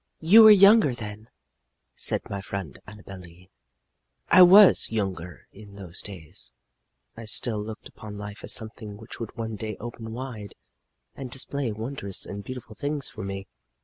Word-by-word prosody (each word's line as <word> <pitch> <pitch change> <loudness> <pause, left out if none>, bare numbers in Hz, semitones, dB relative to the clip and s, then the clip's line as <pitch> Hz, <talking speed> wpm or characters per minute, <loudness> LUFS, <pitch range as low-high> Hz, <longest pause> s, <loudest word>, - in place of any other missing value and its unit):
"You 190 +8 +7
were 220 - +10
younger 200 - +6
then," 110 -1 -9 0.6
said - - -3
my 100 -1 -5
friend 95 -7 -7
Annabel 100 -2 -11
Lee. 90 +1 -16 0.8
"I 185 - +7
was 190 +3 +7
younger, 95 -5 -4
and 100 - -15
in 100 -2 -14
those 95 -3 -6
days 85 - -8 0.6
I 115 - -9
still 110 0 -1
looked 110 0 -9
upon 105 -1 -11
life 105 +1 -9
as - - +2
something 110 -2 -2
which 110 +2 -11
would 115 +1 -8
one 115 -1 -4
day 110 -1 -6
open 115 -1 -8
wide 115 -4 -8 0.6
and 135 -2 -8
display 135 0 -3
wondrous 110 -2 -3
and 100 0 -7
beautiful 125 -2 -9
things 145 +5 -2
for 110 -1 -8
me. 95 0 -6
110 Hz, 160 wpm, -25 LUFS, 100-125 Hz, 0.8 s, were